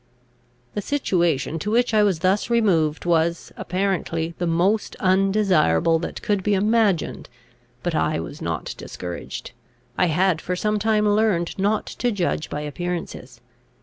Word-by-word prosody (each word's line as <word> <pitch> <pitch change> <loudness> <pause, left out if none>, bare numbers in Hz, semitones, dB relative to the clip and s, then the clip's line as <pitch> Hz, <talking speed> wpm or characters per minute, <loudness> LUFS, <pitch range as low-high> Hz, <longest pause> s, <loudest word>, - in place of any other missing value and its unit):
] 120 0 -38
The 205 - -2
situation 175 - 0
to 205 - -3
which 235 +1 +2
I 215 - +5
was 195 -6 +2
thus 195 +5 +1
removed 175 -11 +2
was, 170 0 +1
apparently, 180 -3 -2
the 175 - 0
most 180 +6 +1
undesirable 185 - +3
that 170 - -6
could 205 -2 +1
be 205 +1 +1
imagined 210 -3 +1 0.5
but - - -1
I 80 0 +1
was 80 - -7
not - - -3
discouraged; 90 -1 -7 0.5
I 180 - +4
had 175 +1 +2
for 180 - -2
some 210 +3 0
time 210 0 +2
learned 205 -5 +1
not 205 +2 +1
to 245 - -2
judge 180 -6 -1
by 150 - -4
appearances. 150 -5 -5
185 Hz, 150 wpm, -23 LUFS, 160-210 Hz, 0.5 s, I